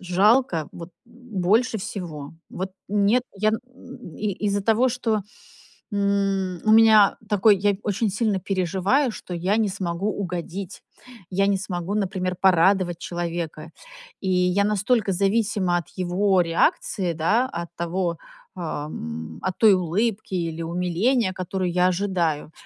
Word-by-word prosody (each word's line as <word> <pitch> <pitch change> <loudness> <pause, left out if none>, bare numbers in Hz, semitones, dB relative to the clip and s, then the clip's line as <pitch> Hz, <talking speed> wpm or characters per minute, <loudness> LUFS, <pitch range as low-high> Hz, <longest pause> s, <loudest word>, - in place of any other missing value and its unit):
жалко 185 - +2
вот 170 0 -9
больше 230 -1 0
всего. 160 -7 -6 0.2
Вот, 190 +1 -5 0.2
нет, 205 +4 +2
я 215 +2 +2
н 220 - -1 0.6
и 210 -1 -2
из-за 200 0 +1
того, 225 +5 +3
что, 230 -4 -1 0.7
м, 195 -3 0
у 215 - +4
меня 220 -2 +6
такой, 210 0 +4
я 200 +1 +1
очень 210 +2 0
сильно 205 0 0
переживаю, 195 - 0
что 185 - -8
я 180 +4 0
не 220 -2 +1
смогу 185 +1 -2
угодить. 185 -1 -5 0.5
Я 195 +1 +1
не 200 -1 +2
смогу, 185 0 -4
например, 185 -3 -1
порадовать 185 -1 +3
человека. 170 -2 -5 0.5
И 190 - -2
я 180 +2 +2
настолько 210 +1 +1
зависима 200 -2 +1
от 170 - -5
его 185 +1 +2
реакции, 170 +1 0
да, 210 +11 +1
от 170 - -7
того, 170 0 -2 0.4
э, - - -7 0.3
м, 80 - -7
от 185 - -1
той 220 -3 +7
улыбки 195 +4 -1
или 165 -2 -3
умиления, 180 +7 0
которую 185 0 -3
я 180 +1 +3
ожидаю, 175 -5 -1
190 Hz, 135 wpm, -23 LUFS, 175-210 Hz, 0.7 s, той